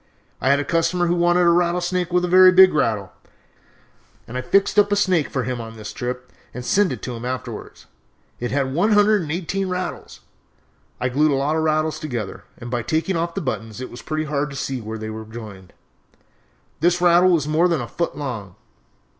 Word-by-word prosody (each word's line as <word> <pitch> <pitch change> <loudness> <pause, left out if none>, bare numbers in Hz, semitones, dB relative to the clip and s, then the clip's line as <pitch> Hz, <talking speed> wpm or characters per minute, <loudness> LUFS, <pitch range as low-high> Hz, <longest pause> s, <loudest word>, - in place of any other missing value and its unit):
I 130 - +1
had 140 +1 +4
a - - -1
customer 170 +3 +1
who 170 - +1
wanted 175 0 +3
a 170 - +5
rattlesnake 175 +1 +1
with 180 0 +2
a - - -2
very 185 +1 +7
big 185 0 +7
rattle, 110 -9 0 1.2
and 115 - -9
I 125 - -1
fixed 195 +10 +2
up 205 0 +3
a - - +4
snake 185 -6 +1
for 130 - -2
him 125 -1 -3
on 115 0 -9
this 110 -1 -8
trip 125 +1 -5 0.2
and 125 0 -6
sent 200 +5 +2
it - - -6
to 125 - -4
him 115 - -8
afterwards. 130 +1 -6 0.5
It 120 - -3
had 135 -1 -1
one 205 +8 +2
hundred 205 0 +4
and 155 -3 -5
eighteen 185 +3 -2
rattles! 180 -2 -5 0.8
I 125 - 0
glued 150 +5 +2
a 140 - +2
lot 145 +3 0
of 160 - +1
rattles 155 0 0
together, 125 - -5
and 120 0 -8
by 120 -1 -1
taking 160 - -1
off 170 0 -2
the 195 - -2
buttons 115 -6 -4
it 130 - -7
was 120 - -9
pretty 155 0 -3
hard 150 -1 -2
to 140 - -9
see 135 -2 -3
where 110 +1 -6
they 110 0 -6
were 110 0 -7
joined. 110 -5 -10 1.1
This 175 +2 +2
rattle 175 +1 +5
was 160 -5 +2
more 160 +3 +3
than 170 -4 0
a 120 - -5
foot 170 +9 -3
long. 110 -10 -5
155 Hz, 215 wpm, -21 LUFS, 125-175 Hz, 1.2 s, very